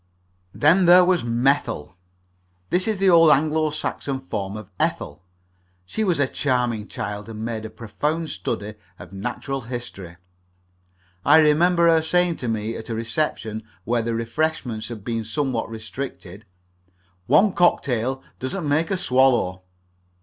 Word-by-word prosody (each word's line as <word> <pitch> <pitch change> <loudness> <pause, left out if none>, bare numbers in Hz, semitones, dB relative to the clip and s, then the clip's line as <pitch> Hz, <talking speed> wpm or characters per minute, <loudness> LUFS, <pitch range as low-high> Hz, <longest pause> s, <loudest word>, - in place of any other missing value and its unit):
Then 170 - +4
there 180 +1 +8
was 180 -4 +2
Methyll 120 - 0 0.8
this 185 +3 +1
is 215 -2 0
the 190 -1 +4
old 165 -2 +7
Anglo 155 +2 +3
Saxon 140 -2 -3
form 105 -6 -5
of 105 -2 -10
Ethel. - - -2 0.6
She 220 - -3
was 180 -7 +1
a 140 - +3
charming 125 -6 -1
child 105 +1 -6
and 110 0 -6
made 110 -2 -4
a - - -6
profound 150 +9 -3
study 105 +1 -4 0.2
of - - -12
natural 125 +7 -4
history. 115 -7 -7 1.1
I - - +6
remember 170 +3 +4
her 165 -1 +5
saying 175 +1 +1
to 125 - -5
me 110 0 -2
at 110 - -8
a 115 - -2
reception 115 -2 -2 0.2
where 120 +3 0
the 115 0 -2
refreshments 115 -1 -2
had 110 -4 -8
been 115 0 -2
somewhat 125 0 -2
restricted: 110 -3 -7 0.8
"One 200 -1 +4
cocktail 130 -6 +1 0.2
doesn't 150 +6 -3
make 155 +3 +1
a 195 - 0
swallow." 125 - +2
130 Hz, 140 wpm, -23 LUFS, 110-160 Hz, 1.1 s, there